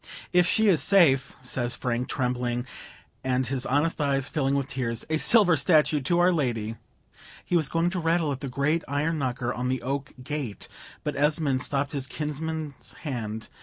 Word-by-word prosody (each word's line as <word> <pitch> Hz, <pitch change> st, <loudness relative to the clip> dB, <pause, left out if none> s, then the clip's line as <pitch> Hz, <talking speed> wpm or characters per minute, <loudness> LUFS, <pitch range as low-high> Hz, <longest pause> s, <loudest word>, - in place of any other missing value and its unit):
"If 180 Hz, 0 st, +5 dB
she 220 Hz, +3 st, +3 dB
is 180 Hz, -6 st, +4 dB
safe," 165 Hz, -10 st, +4 dB
says 120 Hz, -1 st, -1 dB
Frank, 125 Hz, 0 st, -2 dB
trembling, 125 Hz, -1 st, -1 dB, 0.6 s
and 130 Hz, 0 st, +1 dB
his 130 Hz, +1 st, -2 dB
honest 150 Hz, +4 st, +1 dB
eyes 140 Hz, -1 st, +1 dB
filling 140 Hz, -3 st, +1 dB
with 140 Hz, -1 st, 0 dB
tears, 120 Hz, -4 st, -3 dB
"a 160 Hz, -, +2 dB
silver 195 Hz, -1 st, +5 dB
statue 150 Hz, 0 st, +3 dB
to 170 Hz, +6 st, +1 dB
Our 180 Hz, +1 st, +4 dB
Lady!" 115 Hz, -8 st, -1 dB, 0.7 s
He -, -, -1 dB
was 160 Hz, -5 st, +2 dB
going 170 Hz, +1 st, +1 dB
to 185 Hz, -, -2 dB
rattle 165 Hz, -2 st, +1 dB
at 135 Hz, -, -4 dB
the 140 Hz, -, -5 dB
great 150 Hz, +6 st, 0 dB
iron 150 Hz, +3 st, -1 dB
knocker 125 Hz, -2 st, -2 dB
on 125 Hz, +1 st, -3 dB
the 130 Hz, -2 st, -2 dB
oak 140 Hz, +2 st, -3 dB
gate; 140 Hz, -7 st, -5 dB, 0.4 s
but -, -, -3 dB
Esmond 145 Hz, -3 st, +1 dB
stopped 140 Hz, +1 st, -1 dB
his 135 Hz, -3 st, -3 dB
kinsman's 150 Hz, 0 st, -5 dB
hand. 110 Hz, -6 st, -4 dB
140 Hz, 175 wpm, -26 LUFS, 125-160 Hz, 0.7 s, If